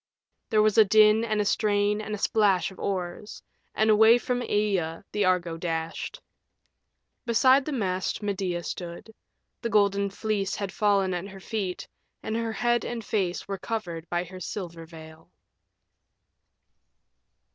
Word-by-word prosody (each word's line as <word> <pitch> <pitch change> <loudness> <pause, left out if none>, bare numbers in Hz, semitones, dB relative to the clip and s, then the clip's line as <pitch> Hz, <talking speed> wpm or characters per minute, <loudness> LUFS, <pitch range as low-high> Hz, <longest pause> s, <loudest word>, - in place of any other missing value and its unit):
There 215 -2 +4
was 215 +1 +3
a - - +10
din 215 +2 +5
and 215 -2 -1
a 210 - +1
strain 205 0 +1
and 215 0 -4
a - - -6
splash 200 -3 +2
of 190 - -14
oars, 185 +1 -4 0.3
and 220 0 +3
away 220 +2 +7
from 245 0 -2
Aea 195 -8 -1
the 210 -1 +1
Argo 175 -3 +1
dashed. 165 -1 -4 1.1
Beside 260 +4 +4
the 305 - -3
mast 190 -5 -2
Medea 185 -4 -2
stood; 175 +6 -7 0.5
the 235 - -2
Golden 200 -2 +2
Fleece 200 -1 -2
had 200 -2 -4
fallen 200 -3 +2
at 180 +2 -4
her 195 -1 -11
feet, 190 -3 -4 0.4
and 220 - -3
her 230 -1 -2
head 240 0 +1
and 230 -3 -5
face 185 -5 -1
were 195 -1 -4
covered 175 -7 -5
by 175 0 0
her 185 +1 -10
silver 170 -3 -6
veil. 160 -1 -13
200 Hz, 145 wpm, -26 LUFS, 180-215 Hz, 1.1 s, a